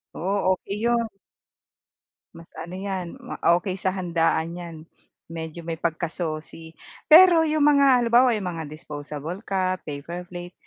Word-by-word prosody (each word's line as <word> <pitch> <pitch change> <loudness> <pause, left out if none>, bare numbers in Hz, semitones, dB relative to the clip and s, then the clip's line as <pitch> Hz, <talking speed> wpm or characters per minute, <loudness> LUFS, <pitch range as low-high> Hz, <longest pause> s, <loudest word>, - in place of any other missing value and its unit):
Oo, 190 +1 +1
okey 195 +2 -6
yun. 235 -1 +1 1.3
Mas 165 0 -12
ano 165 +3 -8
'yan, 190 +1 -5
ma 250 -1 -9 0.2
okey 185 0 -4
sa 190 0 -1
handaan 170 -3 0
'yan, 175 -2 -8 0.5
medyo 165 0 -7
may 165 -1 -4
pagkasosi. 160 -1 -4 0.3
Pero 340 +1 +8
'yong 310 -1 +1
mga 280 -3 +5
halimbawa, 240 0 +4
'yong 195 - -5
mga 165 - -5
disposable 150 +3 -7
cup, 185 -3 -1
paper 170 +5 -7
plate, 175 0 -8
180 Hz, 135 wpm, -24 LUFS, 165-215 Hz, 1.3 s, Pero